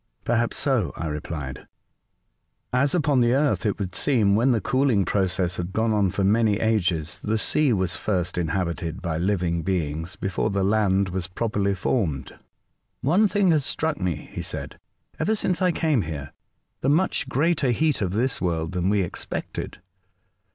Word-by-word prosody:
"Perhaps 120 0 0
so," 130 - +1
I 85 - -3
replied, 75 -3 -5 0.5
'* - - -49
as 140 +4 +1
upon 145 -6 +2
the 120 +1 +3
Earth 140 -5 +1
it 100 - -1
would 95 -3 -4
seem, 105 -4 +3
when 120 +5 +3
the 120 -3 +3
cooling 125 -2 +2
process 95 -2 0
had 90 +1 -4
gone 110 +1 +1
on 100 -3 +2
for 100 - -1
many 105 +1 +3
ages, 90 -8 0
the 110 +1 0
sea 150 +5 +2
was 95 -5 0
first 90 -4 -1
inhabited 85 0 -2
by 80 -3 -2
living 90 -3 0
beings, 80 0 -2
before 95 -2 -1
the 100 -1 0
land 100 -1 +2
was 90 0 -3
properly 100 0 -1
formed." 90 - -1 0.4
'' - - -47 0.3
One 185 +10 +4
thing 200 -3 +2
has 155 -3 +2
struck 160 -2 -2
me," 90 -4 -2
he - - -5
said, - - -7
'^ - - -42
ever 220 - +1
since 185 -3 -1
I 180 -1 +4
came 155 -7 +1
here, 75 -5 -6 0.2
— - - -50
the 135 - +1
much 155 -2 +1
greater 150 0 +1
heat 150 +3 +1
of 95 -2 -1
this 125 +6 0
world 80 -2 -1
than 90 0 0
we 100 -1 +2
expected. 85 - -5
100 Hz, 180 wpm, -24 LUFS, 90-130 Hz, 0.5 s, One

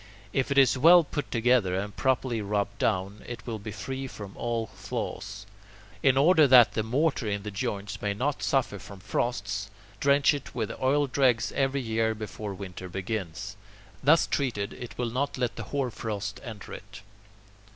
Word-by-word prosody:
If 135 - +1
it 140 - 0
is 130 -2 +5
well 170 +4 +8
put 145 0 -4
together 115 -5 +2
and 100 +1 -3
properly 120 +2 0
rubbed 100 0 -2
down, 100 +1 0
it 120 -2 -7
will 115 -3 -4
be 105 +1 -7
free 130 +6 -5
from 100 -5 -9
all 115 -1 -2
flaws. - - -6 0.6
In 135 -1 +4
order 155 +1 +6
that 125 -3 +8
the 110 - -1
mortar 130 +2 0
in 100 -1 -2
the 105 - -5
joints 105 -1 -4
may 100 -1 -1
not 140 +6 -1
suffer 130 -7 0
from 100 0 -11
frosts, 100 -1 -2 0.3
drench 140 +1 +4
it 140 -3 -6
with 110 -3 -2
oil 140 +3 +3
dregs 125 -4 +2
every 135 0 0
year 110 -1 0
before 105 -1 -6
winter 95 -2 -8
begins. 95 0 -4 0.5
Thus 155 +4 +5
treated, 115 -7 -1
it 120 - -9
will 120 -2 -1
not 135 +4 -1
let 125 -2 -1
the 115 - -6
hoarfrost 110 -6 -3
enter 110 -5 -8
it. 100 0 -10
115 Hz, 170 wpm, -28 LUFS, 100-130 Hz, 0.6 s, well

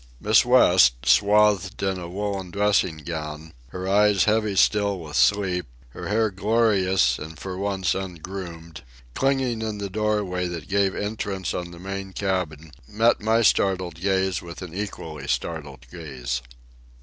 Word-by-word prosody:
Miss - - +4
West, - - +5
swathed 100 +8 +3
in 95 -1 0
a 85 -1 -7
woollen 100 0 -3
dressing 100 -3 +1
gown, 80 -1 -6
her 90 +7 -6
eyes 105 0 +4
heavy 110 -2 +1
still 100 0 +3
with 75 -2 -8
sleep, 95 -3 +2 0.2
her - - -8
hair 110 +1 +1
glorious 95 - +2
and 80 +1 -8
for 95 - -7
the 90 - -5
once 95 -3 0
ungroomed, 85 -3 -7 0.3
clinging 130 - 0
in 110 -1 -3
the 100 -1 -5
doorway 105 -4 -1
that 85 -4 -6
gave 100 -1 +1
entrance 100 -2 -3
on 90 -1 -4
the 85 - -11
main 95 +1 -6
cabin, 85 -6 -3 0.2
met 110 - +2
my 110 +2 +2
startled 95 -4 +2
gaze 95 -2 0
with 85 +2 -9
an 85 -3 -9
equally 80 -7 -6
startled 70 -6 -3
gaze. 65 -6 -5
95 Hz, 150 wpm, -24 LUFS, 85-105 Hz, 0.3 s, West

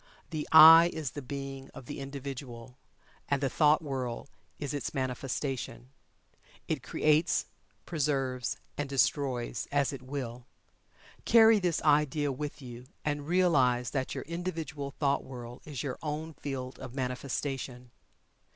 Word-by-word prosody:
The 155 -2 -3
"I" 165 +2 +10
is 150 -6 -4
the 145 - -6
Being 135 0 -6
of 130 - -9
the 145 - -6
Individual, 135 -3 -7 0.5
and 140 - +2
the 135 -2 -1
thought 150 0 +4
world 130 -3 -4 0.3
is 145 -1 -4
its 145 - -4
manifestation. 130 -2 -3 0.8
It - - -1
creates, 155 +3 +2 0.4
preserves, 135 -7 -1 0.2
and 145 -1 -2
destroys 130 -3 0
as 140 -1 +1
it 135 - -7
Will. 130 -2 -6 0.8
Carry 225 -2 +7
this 175 -4 0
idea 150 -1 +3
with 145 +1 -5
you, 125 0 -9 0.2
and 145 -1 -2
realize 135 -9 +3
that 130 -2 -2
your - - -4
individual 165 -4 -4
thought 140 0 0
world 120 -1 -9
is 145 -6 -5
your 135 -3 -4
own 155 +1 -4
field 135 -3 -6
of 130 -1 -8
manifestation. 125 -1 -4
140 Hz, 135 wpm, -30 LUFS, 125-150 Hz, 0.8 s, I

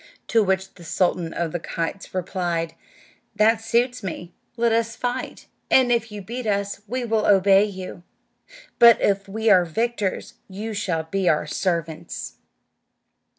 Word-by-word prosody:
To 225 - +4
which 190 -1 0
the 175 - -15
sultan 175 0 0
of 170 -1 -2
the 175 - -3
kites 170 +2 -4
replied, 175 -3 -2 0.6
"That 220 +2 +3
suits 240 +2 +1
me; 175 -2 -6 0.2
let 235 0 +2
us 230 0 0
fight, 245 +1 -4 0.2
and 255 -2 +5
if 230 -2 +1
you 205 -1 -7
beat 235 +4 -5
us 200 -1 -1
we 250 +3 -2
will 220 -2 +1
obey 195 0 +5
you, 190 -3 -7 0.8
but 235 -1 +8
if 195 0 +1
we 220 +2 +1
are 180 -2 +6
victors 210 +3 -2
you 210 +4 -5
shall 180 -6 -1
be 185 +3 0
our 150 0 +2
servants." 165 0 -3
200 Hz, 150 wpm, -23 LUFS, 175-225 Hz, 0.8 s, but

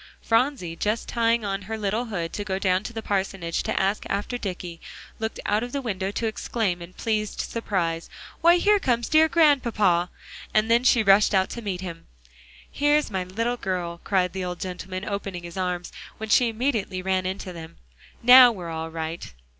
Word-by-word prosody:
Phronsie, 225 - 0
just 210 +5 -1
tying 230 -1 +1
on 195 -1 -2
her 220 - -2
little 215 +3 -1
hood, 175 -7 -4
to 205 - -3
go 190 -2 -2
down 185 -1 +1
to - - -5
the 225 -1 -6
parsonage 190 -4 -1
to - - -1
ask 195 +2 0
after 205 +5 -2
Dicky, 180 -6 -5 0.4
looked 220 0 -3
out 210 +1 +1
of 245 +1 -5
the 280 - -1
window 195 -5 -2
to 215 +3 -3
exclaim 215 -4 -2
in 170 +2 -10
pleased 215 -1 -2
surprise, 170 -7 -2 0.3
"Why, 340 +1 +6
here 415 +3 +4
comes 240 -8 0
dear 315 0 +5
Grandpapa," 230 - +3 0.5
and 215 +1 +3
then 235 +1 +4
she 240 -3 +4
rushed 200 +1 +5
out 190 0 +2
to 235 - -6
meet 190 -4 -4
him. 170 -3 -8 0.6
"Here's 290 -2 +2
my 190 -2 -2
little 230 +6 -2
girl," 175 -4 -3
cried 185 -2 +1
the 190 -1 -3
old 180 -1 -4
gentleman, 185 +1 -5
opening 195 -3 -4
his 170 -1 -9
arms, 180 -2 -3 0.3
when 220 0 -6
she 240 +2 +4
immediately 220 -6 -2
ran 185 -1 0
into 190 -1 -5
them. 165 -1 -10 0.5
"Now 250 0 +9
we're 180 -6 -7
all 160 0 -4
right." 160 - -5
200 Hz, 185 wpm, -25 LUFS, 180-230 Hz, 0.6 s, Now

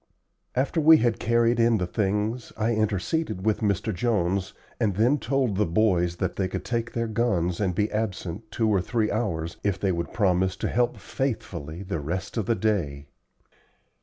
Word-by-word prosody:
After 140 +6 +1
we 160 +1 +8
had 120 -6 +1
carried 115 0 +2
in 115 -1 +4
the 90 - -1
things 105 +5 -1
I 110 +2 +1
interceded 110 - -1
with 110 -1 +2
Mr. 100 -4 0
Jones 95 -2 0 0.3
and 105 -6 +1
then 120 +8 +3
told 130 -4 0
the 105 - +3
boys 90 -2 +2
that 95 +1 -3
they 95 - +1
could - - -5
take 115 -1 -2
their 115 0 -1
guns 100 -7 0
and 95 -4 0
be 105 +2 0
absent 105 -1 -3
two 115 - 0
or 100 -4 +3
three 110 +3 0
hours 85 -7 -2
if 100 -2 0
they 95 - +1
would 85 -1 -3
promise 95 -2 +2
to - - -2
help 120 0 +1
faithfully 95 - -4
the 95 -4 -3
rest 85 +6 -4
of 110 -4 -1
the 115 - +2
day. 85 -10 -1
105 Hz, 180 wpm, -26 LUFS, 90-115 Hz, 0.3 s, we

